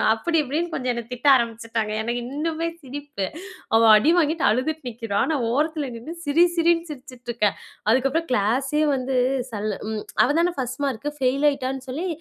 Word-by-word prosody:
அப்படி 330 +9 -1
இப்படின்னு 320 +5 -2
கொஞ்சம் 255 -1 -1
என்ன 235 0 -4
திட்ட 250 +4 -2
ஆரம்பிச்சிட்டாங்க. 230 -2 -1
எனக்கு 240 +1 -2
இன்னுமே 325 +2 -2
சிரிப்பு. 280 -7 -5 0.5
அவ 225 - +6 0.2
அடி 295 +10 +3
வாங்கிட்டு 315 -2 +1
அழுதுட்டு 260 +5 -1
நிக்கிறா, 225 -3 -4
ஆனா 315 -2 0
ஓரத்துல 300 +1 0
நின்னு, 275 +9 -7
சிரி 305 +5 +5
சிரி 340 0 +4 0.2
சிரிச்சுட்ருக்கேன். 240 -6 -3 0.4
அதுக்கப்றம் 270 +7 +1
கிளாஸே 260 +7 +1
வந்து 260 0 -2 0.4
சல் 215 -1 -3 0.2
ம் 215 -1 -3 0.2
அவதானே 335 +6 +2
ஃபர்ஸ்ட் 255 +1 -4
மார்க்கு, 270 +2 -2
ஃபெயில் 270 +2 +1
ஆயிட்டான்னு 265 -1 -4
சொல்லி 310 +9 -3
265 Hz, 150 wpm, -23 LUFS, 235-305 Hz, 0.5 s, அவ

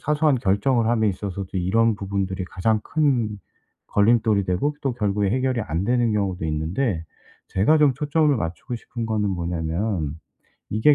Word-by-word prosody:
사소한 150 0 +2
결정을 115 +4 +2
함에 110 -2 +2
있어서도 95 -1 -4
이런 110 +5 +2
부분들이 95 -1 -3
가장 105 +4 0
큰 125 -9 0 0.5
걸림돌이 110 -1 +3
되고 95 +12 0
또 135 -3 -1
결국에 105 -4 0
해결이 130 +1 0
안 85 -2 -2
되는 120 0 +2
경우도 95 -5 -1
있는데 80 - -1 0.4
제가 110 +12 +3
좀 145 -3 +4
초점을 150 +1 +2
맞추고 90 +5 -4
싶은 115 0 -6
거는 105 -2 0
뭐냐면 85 -1 -2 0.5
이게 110 +8 +4
105 Hz, 335 characters per minute, -23 LUFS, 95-125 Hz, 0.5 s, 좀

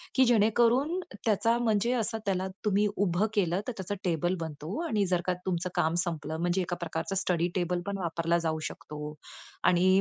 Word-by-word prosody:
की 260 - +6
जेणेकरून 240 - +3 0.3
त्याचा 225 +2 +3
म्हणजे 230 0 +2
असं 225 0 -1
त्याला 190 -1 0 0.2
तुम्ही 210 0 +3
उभं 195 0 +2
केलं, 185 -2 +2
तर 250 - -2
त्याचा 190 +1 -3
टेबल 175 +1 +1
बनतो 160 +3 -5
आणि 210 -6 +1
जर 180 -1 +1
का 185 - +2
तुमचं 180 -1 -1
काम 160 +1 +2
संपलं, 160 -3 -3
म्हणजे 175 +2 +1
एका 175 0 -2
प्रकारचा 165 +3 -3
स्टडी 180 -2 +1
टेबल 180 -1 0
पण 200 0 -2
वापरला 170 -1 0
जाऊ 160 0 -1
शकतो 150 0 -7 0.5
आणि 180 +1 +4
185 Hz, 175 wpm, -29 LUFS, 170-210 Hz, 0.5 s, की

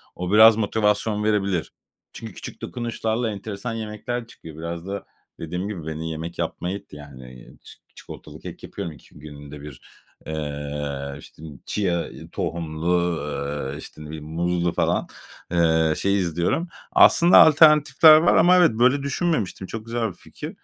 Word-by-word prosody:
O 90 +1 -4
biraz 110 +1 +8
motivasyon 105 0 0
verebilir. 100 -5 0 0.4
Çünkü 110 -3 -9
küçük - - -9
dokunuşlarla 115 -1 -2
enteresan 105 +3 -6
yemekler 115 +2 -5
çıkıyor. 80 -8 -13
Biraz 85 +2 -6
da 100 0 -5 0.3
dediğim 90 +4 -4
gibi 90 -7 -6
beni 80 +1 -4
yemek 80 +2 -7
yapmaya 90 +3 -3
itti, 100 -6 -15
yani, 65 -4 -12 0.2
ç - - -14 0.2
çikolatalı - - -11
kek - - -10
yapıyorum 85 - -6
iki 75 - -18
günde 75 -1 -11
bir. 75 -3 -11 0.4
Eee, 75 -2 -5
işte, 75 - -15 0.2
chia 90 -5 -1 0.2
tohumlu, 85 +1 -1 0.5
eee, - - -7
işte, 75 0 -11
bir 80 - -6
muzlu 85 +2 -1
falan, - - 0 0.4
eee, 80 -2 +3
şey 100 +1 +1
izliyorum. 85 - -1 0.2
Aslında, 170 +2 +6
alternatifler 155 0 +7
var 165 +2 +3
ama 175 +3 +6
evet, 175 -6 +5
böyle 125 +5 +2
düşünmemiştim. 140 - -2
Çok 110 +2 -7
güzel 115 0 -2
bir - - -9
fikir. - - -9
90 Hz, 140 wpm, -23 LUFS, 80-110 Hz, 0.5 s, biraz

